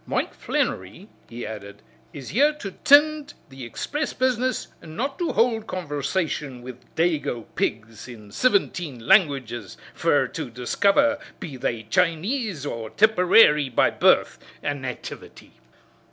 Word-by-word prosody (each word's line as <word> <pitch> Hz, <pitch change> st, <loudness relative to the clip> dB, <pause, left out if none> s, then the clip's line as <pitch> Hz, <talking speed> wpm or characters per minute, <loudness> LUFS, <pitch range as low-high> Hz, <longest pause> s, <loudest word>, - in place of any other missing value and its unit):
Mike -, -, -1 dB
Flannery," 100 Hz, -, -3 dB, 0.2 s
he 120 Hz, +1 st, -7 dB
added, 100 Hz, -1 st, -9 dB, 0.3 s
"is 140 Hz, -4 st, -9 dB
here 285 Hz, -, +3 dB
to 245 Hz, -10 st, -7 dB
tind 295 Hz, +1 st, +5 dB
to -, -, -14 dB
the 135 Hz, -1 st, -10 dB
expriss 295 Hz, -, -4 dB
business 255 Hz, 0 st, 0 dB
and 160 Hz, 0 st, -11 dB
not 275 Hz, +5 st, -3 dB
to 345 Hz, -, 0 dB
hould 225 Hz, -2 st, +1 dB
conversation 145 Hz, -5 st, -3 dB
wid 125 Hz, -1 st, -9 dB, 0.2 s
dago 155 Hz, -8 st, 0 dB
pigs 115 Hz, +1 st, -3 dB
in 110 Hz, -4 st, -12 dB
sivinteen 175 Hz, -, 0 dB
languages 130 Hz, -, +1 dB, 0.2 s
fer -, -, +2 dB
to -, -, -6 dB
discover 200 Hz, -, +2 dB, 0.2 s
be 145 Hz, -, -7 dB
they 120 Hz, -3 st, -3 dB
Chinese 180 Hz, -, -1 dB
or 115 Hz, -5 st, -5 dB
Tipperary 180 Hz, -, +5 dB
by 120 Hz, -, +2 dB
birth -, -, +3 dB, 0.2 s
an' 145 Hz, -1 st, -2 dB
nativity." 130 Hz, -1 st, -8 dB
155 Hz, 130 wpm, -24 LUFS, -, 0.3 s, tind